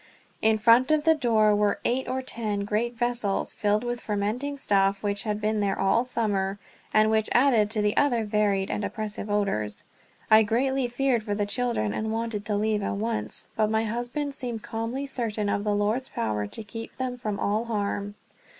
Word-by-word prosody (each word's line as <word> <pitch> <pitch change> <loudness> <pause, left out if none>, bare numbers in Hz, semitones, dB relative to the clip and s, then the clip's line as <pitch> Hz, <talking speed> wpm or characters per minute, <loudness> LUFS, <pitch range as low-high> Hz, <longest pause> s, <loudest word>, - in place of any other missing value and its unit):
In 220 0 +4
front 235 +4 +5
of 310 -1 +3
the 320 0 +5
door 225 -7 +3
were 205 0 +1
eight 255 +2 0
or 260 0 -2
ten 215 -5 -2
great 225 +4 -1
vessels, 240 -4 0
filled 210 +1 +1
with 240 0 -3
fermenting 220 +8 -2
stuff 195 -5 +1
which 200 -1 0
had 210 -1 -1
been 215 0 0
there 200 -1 0
all 195 +5 +3
summer, 205 -6 -1 0.3
and 215 0 +4
which 220 -1 +2
added 240 -5 +4
to 215 -1 0
the 210 0 +1
other 245 -6 +2
varied 205 -2 +1
and 210 - -2
oppressive 215 -1 -4
odors. 195 - -1 0.5
I 220 0 +9
greatly 255 +4 +1
feared 245 -1 +1
for 210 -2 -3
the 205 0 0
children, 235 - -1
and 220 0 -2
wanted 225 -2 -2
to 210 - -1
leave 210 0 +1
at 200 - -2
once, 220 +2 -3
but 215 -1 +2
my 220 0 +1
husband 245 +6 -3
seemed 240 -5 -4
calmly 235 +5 -3
certain 225 -6 -2
of 200 - 0
the 210 -1 +1
Lord's 215 +6 0
power 105 -2 -2
to 220 - -7
keep 225 +2 -8
them 255 -1 -2
from 210 -4 -4
all 215 +3 0
harm. 205 -2 -2
220 Hz, 190 wpm, -26 LUFS, 205-240 Hz, 0.5 s, I